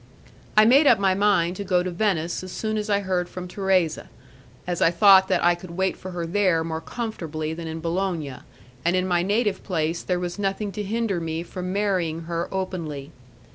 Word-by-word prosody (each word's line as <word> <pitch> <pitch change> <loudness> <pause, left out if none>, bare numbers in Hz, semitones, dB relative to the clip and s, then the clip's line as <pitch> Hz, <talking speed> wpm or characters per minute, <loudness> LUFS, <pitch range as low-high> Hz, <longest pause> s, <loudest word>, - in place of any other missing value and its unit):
I 215 - +8
made 275 +6 +6
up 235 - +7
my 195 -1 +2
mind 185 -3 +2
to 200 - -4
go 180 -3 +2
to 185 - -3
Venice 175 -3 -1
as 185 - -7
soon 215 -1 -2
as 210 +1 -4
I 200 -1 +2
heard 185 -2 -1
from 180 0 -7
Thérèse, 185 -3 0 0.6
as 175 0 -3
I - - +6
thought 190 +2 +6
that - - +1
I 175 0 +5
could 175 +1 -9
wait 190 0 +1
for 185 - -9
her 175 -2 -4
there 180 -2 +2
more 160 0 -4
comfortably 160 -8 -4
than 165 0 -6
in 160 0 -5
Bologna, 165 -5 -2 0.5
and 170 +2 +2
in 185 0 +1
my 175 -1 +2
native 205 +1 0
place 165 -2 -1
there 180 -1 -1
was 175 +2 -4
nothing 200 +1 -1
to 210 - -5
hinder 210 -2 -1
me 165 0 -3
from 180 +1 -5
marrying 185 -5 0
her 170 +1 -3
openly. 165 -7 -4
180 Hz, 205 wpm, -24 LUFS, 170-200 Hz, 0.6 s, I